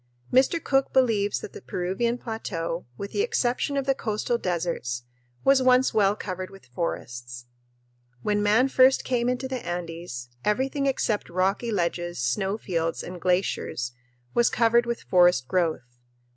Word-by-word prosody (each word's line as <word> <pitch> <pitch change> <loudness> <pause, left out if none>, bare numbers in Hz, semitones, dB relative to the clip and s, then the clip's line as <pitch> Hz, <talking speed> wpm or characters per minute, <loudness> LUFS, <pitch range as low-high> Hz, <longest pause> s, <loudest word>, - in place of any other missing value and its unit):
Mr. 260 +6 +4
Cook 270 -1 +2
believes 220 -6 +2
that - - -8
the - - -9
Peruvian 195 +7 -1
plateau, 180 - -4
with 200 0 -6
the - - 0
exception 285 - 0
of 275 - 0
the 270 - +3
coastal 230 0 -1
deserts, 170 - -2 0.4
was 270 -1 +5
once 255 0 +4
well 205 -2 +3
covered 185 -3 -5
with 195 0 -15
forests. 120 -3 -5 0.8
When 205 0 +1
man 215 +5 +4
first 265 0 +5
came 245 -1 0
into 250 +1 -1
the 260 -2 -4
Andes, 170 -8 -5
everything 270 +6 0
except 230 -5 0
rocky 190 +6 0
ledges, 175 -2 -1
snow 190 - 0
fields, 165 -6 -2
and 180 -1 -8
glaciers 180 -9 0 0.4
was 240 0 +4
covered 235 +1 +3
with 235 0 -3
forest 175 -8 +4
growth. 155 -9 -1
200 Hz, 145 wpm, -26 LUFS, 170-245 Hz, 0.8 s, was